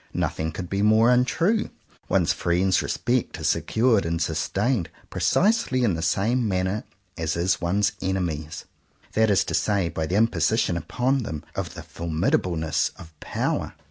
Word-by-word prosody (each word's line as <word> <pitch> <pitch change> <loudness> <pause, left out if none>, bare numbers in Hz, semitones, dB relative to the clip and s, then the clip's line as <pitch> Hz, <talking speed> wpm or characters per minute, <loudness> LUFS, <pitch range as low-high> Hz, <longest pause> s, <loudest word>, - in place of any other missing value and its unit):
Nothing 80 0 -1
could 90 +2 -6
be 100 +3 -1
more 110 +3 +5
untrue. 165 - +2 0.4
One's - - +3
friends' 90 +2 +1
re - - -5
spect 125 0 -1
is 80 0 0
secured 110 +7 +2
and 85 0 -2
sustained 120 -2 0 0.2
precisely 200 - +2
in 105 -6 +2
the 80 - -3
same 115 +7 +1
manner 95 +2 -1 0.3
as 80 -1 -1
is 90 +3 +1
one's 100 +4 +1
enemies'; 85 -5 -3 0.5
that 110 0 +3
is 100 -3 +4
to - - -5
say 100 -5 +1
by 80 -1 -3
the 90 - -1
imposition 110 -3 +2
upon 125 - 0
them 80 -10 -5
of - - -4
the - - -8
formidableness 80 -1 0
of 80 - -12
power. - - -2
95 Hz, 155 wpm, -24 LUFS, 85-115 Hz, 0.5 s, more